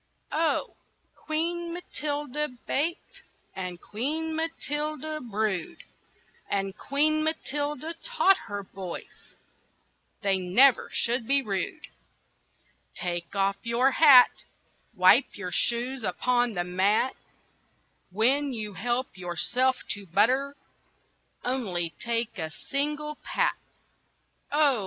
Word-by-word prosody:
OH! 320 +1 0 0.4
Queen 335 +2 -3
Matilda 300 -4 -3 0.2
baked, 325 +5 -2 0.3
And 180 -2 -5
Queen 310 - -3
Matilda 310 -1 -3
brewed; 210 -6 -2 0.7
And 195 0 -1
Queen 305 +6 +2
Matilda 295 0 -2
taught 390 -6 +3
her 205 0 -4
boys 185 -2 -9 0.9
They 195 -1 +2
never 220 +9 +4
should 235 -1 +1
be 275 +1 +3
rude. 205 +8 -3 1.1
"Take 175 +1 -4
off 195 0 +1
your 240 +3 +2
hat! 265 -3 +7 0.5
Wipe 185 +8 +5
your 185 -3 -5
shoes 240 +6 +1
upon 245 +4 +1
the 175 - 0
mat! 195 +8 +1 0.9
When 260 +8 +2
you 215 -3 -5
help 240 +2 -2
yourself 240 +9 0
to 205 -1 -4
butter, 255 - +2 0.9
Only 190 -10 -1
take 235 -2 -2
a 160 -2 -3
single 295 - -3
pat!" - - +1 1.0
Oh! 290 -4 +4
250 Hz, 100 wpm, -27 LUFS, 195-295 Hz, 1.1 s, hat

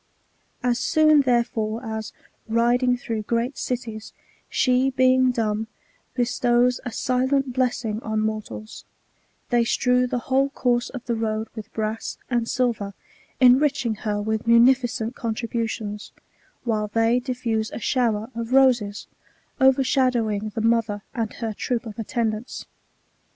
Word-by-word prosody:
As 245 -1 +1
soon, 310 -2 +4
therefore, 235 -3 0
as, 220 -1 -4 0.4
riding 240 +2 +2
through 225 -2 -4
great 235 +5 -1
cities, 225 -3 -5 0.4
she, 255 +1 +2
being 255 0 +4
dumb, 220 -2 -1 0.5
bestows 245 0 +2
a 245 - -5
silent 260 +2 0
blessing 240 -4 -1
on 220 -2 -2
mortals, 215 0 -5 0.7
they 240 -1 +4
strew 250 +1 +2
the 250 - -2
whole 270 +1 +2
course 245 -3 0
of 255 -3 -8
the 240 - -1
road 220 -1 -2
with 220 -1 -8
brass 220 0 -3
and 235 -1 0
silver, 225 -6 -1 0.4
enriching 260 -1 +4
her 210 -1 -3
with 220 +2 -2
munificent 235 -1 +4
contributions; 225 -2 -4 0.5
while 215 -3 0
they 225 +3 +2
diffuse 240 -3 -2
a - - -7
shower 230 -2 0
of 230 0 -4
voses, 245 -5 +3 0.6
overshadowing 255 -5 +2
the 225 - -1
mother 225 -3 +1
and 225 -3 -3
her 225 -2 -4
troop 240 +3 -2
of 220 -1 -8
attend 225 0 -1
ants. 215 +4 -7
235 Hz, 130 wpm, -23 LUFS, 220-250 Hz, 0.7 s, soon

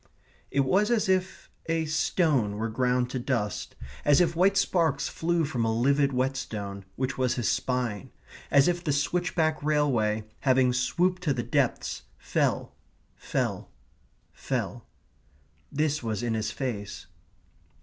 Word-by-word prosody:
It 140 - +2
was 195 - +2
as 230 -4 +2
if 185 0 0 0.2
a 165 0 0
stone 150 - +1
were 115 +1 -2
ground 125 +1 +1
to 130 - -2
dust; 120 -5 -2 0.3
as 145 -1 +5
if 170 -2 +2
white 190 +3 +3
sparks 165 -7 +1
flew 170 0 0
from 125 -5 -2
a 115 - +1
livid 140 +5 +2
whetstone, 110 -7 -3
which 130 0 -3
was 130 -1 +1
his 120 -3 -1
spine; 125 -6 -2 0.4
as 140 0 +5
if 175 0 0
the 150 - 0
switchback 160 +1 0
railway, 130 -8 +1 0.2
having 130 -2 +3
swooped 175 +9 +1
to 150 -6 0
the 120 - -2
depths, - - 0 0.2
fell, - - -1 0.4
fell, - - -2 0.6
fell. - - -4 0.8
This 150 +1 0
was 110 -2 -3
in 120 -1 0
his 110 -1 -1
face. 110 -5 -5
135 Hz, 140 wpm, -27 LUFS, 120-160 Hz, 0.8 s, as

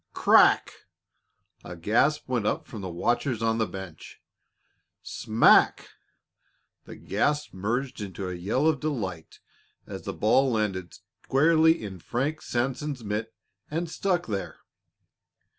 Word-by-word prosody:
Crack! - - +5 0.9
A 90 - -8
gasp 115 - +1
went 120 -5 -1
up - - -1
from 110 - -9
the 95 - -5
watchers 115 - -1
on 115 0 +1
the 110 - +1
bench. 95 -5 -10 0.8
Smack! 115 0 +3 1.0
The - - -10
gasp 150 0 -1
merged 120 +6 -3
into 95 -1 -5
a 90 - -4
yell 100 - -1
of 160 -3 +2
delight 100 - -4 0.5
as - - -8
the - - -5
ball 130 +5 +2
landed 95 -6 -2 0.3
squarely 160 +3 +4
in 95 -3 -7
Frank 140 - -2
Sanson's 130 +2 -3
mitt 105 +2 -4 0.3
and 165 +3 -2
stuck 180 -2 -1
there. 100 -3 -4
115 Hz, 125 wpm, -26 LUFS, 100-145 Hz, 1.0 s, Crack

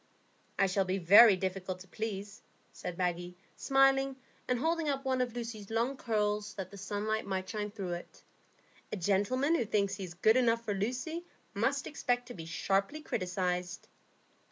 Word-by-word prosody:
"I 195 - +4
shall 195 0 +1
be 185 +1 0
very 200 +4 +8
difficult 185 0 -3
to 190 - -12
please," 205 0 -5 0.3
said 175 - -6
Maggie, 175 -1 -2 0.2
smiling, 270 0 +3 0.3
and 250 - +1
holding 325 +3 0
up 275 -1 -2
one 260 -1 +1
of 245 -2 -2
Lucy's 230 -4 -6
long 230 +4 0
curls, 210 -4 -1
that 190 -2 -6
the 200 - -10
sunlight 210 +2 -2
might 190 -1 -2
shine 210 -1 -3
through 195 -3 -5
it. 175 - -9 0.7
"A - - -2
gentleman 205 - +1
who 335 - +2
thinks 200 -2 +1
he 195 - -5
is 175 -2 -7
good 220 +6 +4
enough 230 -2 +2
for 210 - 0
Lucy 255 - -2 0.3
must 245 +6 0
expect 245 -4 -1
to - - -6
be 165 -5 -8
sharply 195 - 0
criticised." 180 -5 -2
210 Hz, 170 wpm, -32 LUFS, 190-245 Hz, 0.7 s, very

